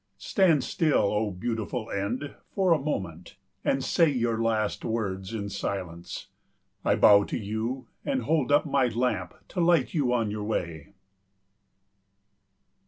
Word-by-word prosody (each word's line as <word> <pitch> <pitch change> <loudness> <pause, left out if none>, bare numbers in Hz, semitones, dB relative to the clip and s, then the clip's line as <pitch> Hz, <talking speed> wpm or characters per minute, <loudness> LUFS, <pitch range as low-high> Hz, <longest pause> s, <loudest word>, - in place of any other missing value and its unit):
Stand 170 - +3
still, 155 -11 +2
O 105 0 +1
Beautiful 110 +4 -3
End, 115 +9 -3 0.2
for 190 -3 +2
a 160 - +1
moment, 95 - -4 0.3
and 135 0 +1
say 165 +3 +3
your 120 -4 0
last 110 -2 0
words 95 -4 -2
in 105 -3 -3
silence. 90 -4 -5 0.6
I - - +3
bow 100 -1 +7
to - - -3
you 110 +5 -3 0.2
and 270 -2 -1
hold 150 -5 +1
up 145 +2 +4
my 140 -3 +2
lamp 110 -7 -1
to 185 - -4
light 170 -1 +3
you 140 -7 +1
on 115 -4 +1
your 105 0 -4
way. 85 -6 -4
115 Hz, 140 wpm, -27 LUFS, 100-140 Hz, 0.6 s, bow